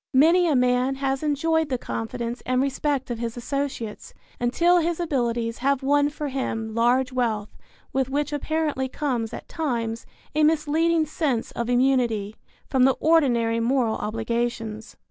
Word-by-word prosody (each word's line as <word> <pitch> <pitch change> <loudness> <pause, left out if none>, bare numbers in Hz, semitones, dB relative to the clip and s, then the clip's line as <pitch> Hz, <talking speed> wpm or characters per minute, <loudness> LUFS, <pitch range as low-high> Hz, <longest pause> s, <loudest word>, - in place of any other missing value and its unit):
Many 335 +6 +5
a 305 - +2
man 250 +1 +2
has 270 0 -1
enjoyed 315 +1 +1
the 255 - 0
confidence 235 +1 -4
and 255 0 0
respect 275 -1 -1
of 235 - -3
his 230 0 -4
associates 250 -4 -4 0.2
until 340 +9 +3
his 340 0 -1
abilities 240 -7 -1
have 275 +1 +1
won 285 +1 +3
for 295 0 -5
him 225 -4 -3
large 250 +3 +2
wealth 220 -4 -1 0.4
with 265 -1 0
which 290 +2 -1
apparently 295 -3 -1
comes 250 -6 -2
at - - -8
times 235 -8 -3 0.3
a 305 +1 +2
misleading 315 +1 +2
sense 285 -6 -1
of 235 0 -3
immunity 245 -5 +1 0.3
from 260 -2 +3
the 265 - +3
ordinary 240 -8 +3
moral 235 -1 +1
obligations. 225 0 -3
260 Hz, 145 wpm, -24 LUFS, 235-295 Hz, 0.4 s, Many